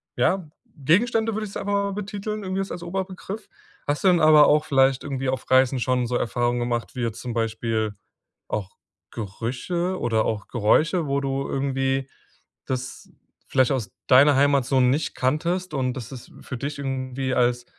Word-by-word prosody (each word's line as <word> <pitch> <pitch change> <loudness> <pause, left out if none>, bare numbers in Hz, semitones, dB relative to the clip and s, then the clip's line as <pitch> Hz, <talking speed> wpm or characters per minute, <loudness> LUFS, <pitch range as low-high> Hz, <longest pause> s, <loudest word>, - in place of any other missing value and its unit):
ja, 185 -5 +1 0.3
Gegenstände 220 - +2
würde 220 - -2
ich 195 - -9
es - - -5
aber 200 0 -1
betiteln, 210 +1 -4
irgendwie 190 0 -2
jetzt 195 - -5
als 175 - -5
Oberbegriff. 190 +3 -5 0.4
Hast 145 0 -1
du 195 - +4
dann 175 -2 +5
aber 155 -1 +7
auch 150 +1 +3
vielleicht 135 -1 +3
irgendwie 135 -2 -2
auf 130 - -3
Reisen 130 0 +4
schon 125 0 0
so 125 - -2
Erfahrungen 120 +1 0
gemacht, 120 +1 -2
wie 125 - -3
jetzt 115 -1 -3
zum 120 -2 -4
Beispiel 110 -1 -1 0.5
auch 100 -3 -3 0.4
Gerüche 130 - -3
oder 110 -2 +1
auch 105 -2 -2
Geräusche, 155 - +2
wo 140 0 0
du 135 0 -2
irgendwie 135 0 -1 0.6
das 130 -1 -5 0.4
vielleicht 130 0 +3
aus 115 -8 -2 0.2
deiner 140 +2 +7
Heimat 140 -1 +4
so 135 +2 +2
nicht 130 +5 +1
kanntest 170 +6 -1
und 130 -2 0
dass 125 -2 -6
das 130 -3 -10
für - - -6
dich 145 +3 -4
irgendwie 130 -1 -3
als 120 0 +1
135 Hz, 170 wpm, -24 LUFS, 125-170 Hz, 0.6 s, aber